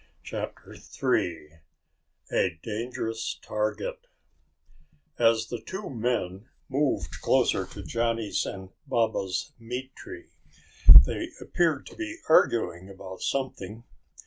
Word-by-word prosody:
CHAPTER -, -, -6 dB
THREE 80 Hz, -2 st, -2 dB, 0.7 s
A 85 Hz, -3 st, +1 dB
Dangerous 115 Hz, 0 st, -3 dB
Target 485 Hz, -, -3 dB, 1.1 s
As 115 Hz, -1 st, +4 dB
the 120 Hz, -2 st, -4 dB
two 190 Hz, -, -6 dB
men 115 Hz, -4 st, -2 dB, 0.2 s
moved 140 Hz, +1 st, -1 dB
closer -, -, +2 dB
to -, -, -9 dB
Johnny's 115 Hz, +3 st, 0 dB
and 95 Hz, -1 st, -7 dB, 0.2 s
Baba's 110 Hz, 0 st, 0 dB
meat 125 Hz, +3 st, -6 dB
tree, 355 Hz, -2 st, -10 dB, 0.7 s
they -, -, -3 dB
appeared -, -, +1 dB
to -, -, -11 dB
be 330 Hz, -1 st, -5 dB
arguing 95 Hz, -, +3 dB
about 95 Hz, -1 st, -9 dB
something. 115 Hz, -5 st, -3 dB
115 Hz, 100 wpm, -27 LUFS, 95-130 Hz, 1.1 s, As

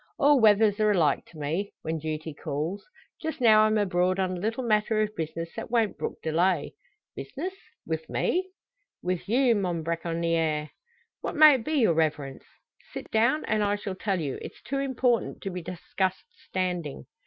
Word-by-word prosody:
"All 285 Hz, -1 st, +5 dB
weathers 210 Hz, -1 st, +5 dB
are 215 Hz, 0 st, +3 dB
alike 175 Hz, -7 st, +2 dB
to 165 Hz, -, -15 dB
me 160 Hz, +7 st, -2 dB
when 160 Hz, 0 st, -2 dB
duty 155 Hz, 0 st, -4 dB
calls. 160 Hz, +8 st, -4 dB, 0.4 s
Just 320 Hz, -2 st, -4 dB
now 215 Hz, -3 st, +6 dB
I'm 215 Hz, 0 st, +2 dB
abroad 185 Hz, -2 st, +1 dB
on 190 Hz, -1 st, 0 dB
a -, -, -5 dB
little 225 Hz, +6 st, -2 dB
matter 215 Hz, -1 st, +2 dB
of 215 Hz, 0 st, -4 dB
business 165 Hz, +1 st, -4 dB
that -, -, -6 dB
won't 225 Hz, -4 st, +1 dB
brook -, -, -4 dB
delay." 165 Hz, 0 st, +1 dB, 0.4 s
"Business 370 Hz, +1 st, -5 dB, 0.3 s
wi' 160 Hz, -1 st, -1 dB
me?" 370 Hz, +1 st, 0 dB, 0.5 s
"With 180 Hz, +1 st, -2 dB
you, 245 Hz, +1 st, +4 dB
mon 180 Hz, -6 st, -1 dB
bracconier!" 165 Hz, -2 st, -1 dB, 0.5 s
"What -, -, -4 dB
may 305 Hz, -1 st, +9 dB
it 255 Hz, -4 st, -1 dB
be, 310 Hz, -, -3 dB
your 230 Hz, -, +4 dB
Reverence?" 150 Hz, -4 st, -1 dB, 0.5 s
"Sit -, -, -8 dB
down, 235 Hz, +7 st, +2 dB
and 215 Hz, -1 st, +1 dB
I 205 Hz, 0 st, +1 dB
shall 205 Hz, -1 st, -5 dB
tell 190 Hz, 0 st, -1 dB
you. 145 Hz, -5 st, -3 dB
It's -, -, -10 dB
too 275 Hz, +2 st, -2 dB
important 255 Hz, -3 st, 0 dB
to 195 Hz, -, -3 dB
be 180 Hz, 0 st, -5 dB
discussed 185 Hz, +2 st, -3 dB, 0.2 s
standing." 180 Hz, -6 st, -3 dB
190 Hz, 175 wpm, -27 LUFS, 165-225 Hz, 0.5 s, may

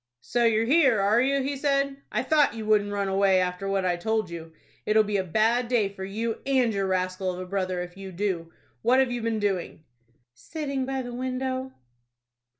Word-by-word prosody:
"So 240 Hz, -1 st, 0 dB
you're 225 Hz, 0 st, +3 dB
here, 265 Hz, -4 st, +4 dB
are 205 Hz, +4 st, +3 dB
you?" 275 Hz, +1 st, +1 dB
he 280 Hz, +1 st, -2 dB
said. 275 Hz, 0 st, 0 dB
"I 240 Hz, -, 0 dB
thought 295 Hz, -2 st, +3 dB
you 220 Hz, -1 st, -5 dB
wouldn't 210 Hz, -1 st, +2 dB
run 200 Hz, -1 st, -1 dB
away 195 Hz, -1 st, +3 dB
after 180 Hz, +1 st, -2 dB
what 195 Hz, -1 st, 0 dB
I 175 Hz, -1 st, +1 dB
told 220 Hz, 0 st, -1 dB
you. 165 Hz, -1 st, -8 dB, 0.3 s
It'll 215 Hz, +1 st, +4 dB
be 210 Hz, -1 st, -1 dB
a 190 Hz, -, 0 dB
bad 225 Hz, +7 st, +1 dB
day 230 Hz, -5 st, +2 dB
for 195 Hz, -1 st, -9 dB
you 220 Hz, +4 st, -3 dB
and 260 Hz, -4 st, +2 dB
your 195 Hz, -1 st, -1 dB
rascal 185 Hz, 0 st, -1 dB
of 180 Hz, -, -7 dB
a 185 Hz, -, -5 dB
brother 185 Hz, -1 st, -2 dB
if 175 Hz, 0 st, -10 dB
you 195 Hz, -1 st, -8 dB
do. 175 Hz, -3 st, -2 dB, 0.3 s
What 245 Hz, +3 st, +3 dB
have 265 Hz, -2 st, +3 dB
you 245 Hz, -1 st, -2 dB
been 225 Hz, -1 st, -1 dB
doing?" 195 Hz, -6 st, -2 dB, 0.5 s
"Sitting 275 Hz, -, -4 dB
by 265 Hz, -1 st, -2 dB
the 245 Hz, 0 st, -7 dB
window." 260 Hz, +1 st, -3 dB
215 Hz, 205 wpm, -26 LUFS, 190-255 Hz, 0.5 s, here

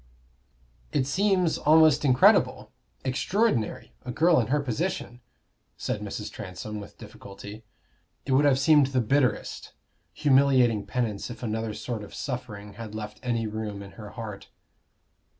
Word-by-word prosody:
"It 130 Hz, -, +1 dB
seems 185 Hz, +3 st, +1 dB
almost 155 Hz, +1 st, +5 dB
incredible 130 Hz, -3 st, +4 dB, 0.3 s
extraordinary 130 Hz, -, 0 dB
a 125 Hz, -, -5 dB
girl 165 Hz, +5 st, +4 dB
in 115 Hz, -, 0 dB
her 150 Hz, +3 st, +1 dB
position," 140 Hz, -1 st, -3 dB, 0.6 s
said 105 Hz, -, -3 dB
Mrs. 105 Hz, 0 st, -5 dB
Transome, 105 Hz, +1 st, -7 dB
with 100 Hz, -, -11 dB
difficulty. 100 Hz, +3 st, -11 dB, 0.6 s
It 135 Hz, -, -3 dB
would 135 Hz, +3 st, +4 dB
have 140 Hz, -2 st, +4 dB
seemed 145 Hz, 0 st, +5 dB
the 130 Hz, -1 st, 0 dB
bitterest, 125 Hz, -1 st, 0 dB, 0.4 s
humiliating 130 Hz, -, +3 dB
penance 115 Hz, -5 st, -2 dB
if 120 Hz, -, -9 dB
another 110 Hz, -1 st, -2 dB
sort 115 Hz, -4 st, -5 dB
of 105 Hz, -, -11 dB
suffering 110 Hz, -6 st, -6 dB
had 110 Hz, 0 st, -8 dB
left 105 Hz, 0 st, -6 dB
any 115 Hz, -2 st, -1 dB
room 105 Hz, -2 st, -5 dB
in 100 Hz, -, -11 dB
her 105 Hz, -2 st, -10 dB
heart. 105 Hz, -4 st, -7 dB
120 Hz, 135 wpm, -27 LUFS, 105-140 Hz, 0.6 s, almost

